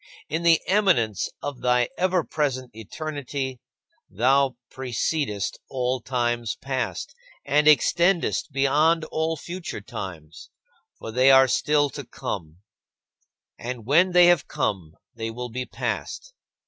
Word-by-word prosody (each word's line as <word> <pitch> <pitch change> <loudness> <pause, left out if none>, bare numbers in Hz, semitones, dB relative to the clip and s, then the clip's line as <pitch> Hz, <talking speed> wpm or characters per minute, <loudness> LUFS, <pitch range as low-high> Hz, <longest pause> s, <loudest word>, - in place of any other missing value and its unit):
In 160 +3 -1
the 170 -1 +5
eminence 180 - +2
of 145 -3 -5
thy 125 -1 +2
ever 185 -1 +1
present 130 -5 -2
eternity, 135 +2 -5 0.5
thou 130 +5 +2 0.2
precedest 130 -3 -2
all 130 -1 -1
times 120 -2 -1
past, 135 -1 -4 0.3
and 150 +2 +2
extendest 170 +2 +3
beyond 150 +5 +2
all 160 +1 -1
future 175 -3 -6
times, 85 -5 -8 0.5
for 115 - -7
they 130 +3 +4
are 135 0 +7
still 145 +3 +2
to - - -7
come 80 +2 -6 1.0
and 120 -2 -6
when 170 +8 +4
they 180 0 +7
have 175 -6 +4
come, 90 -6 -2 0.2
they 115 -1 -4
will 125 +2 -6
be 125 +2 -5
past. - - -4
130 Hz, 120 wpm, -24 LUFS, 120-155 Hz, 1.0 s, are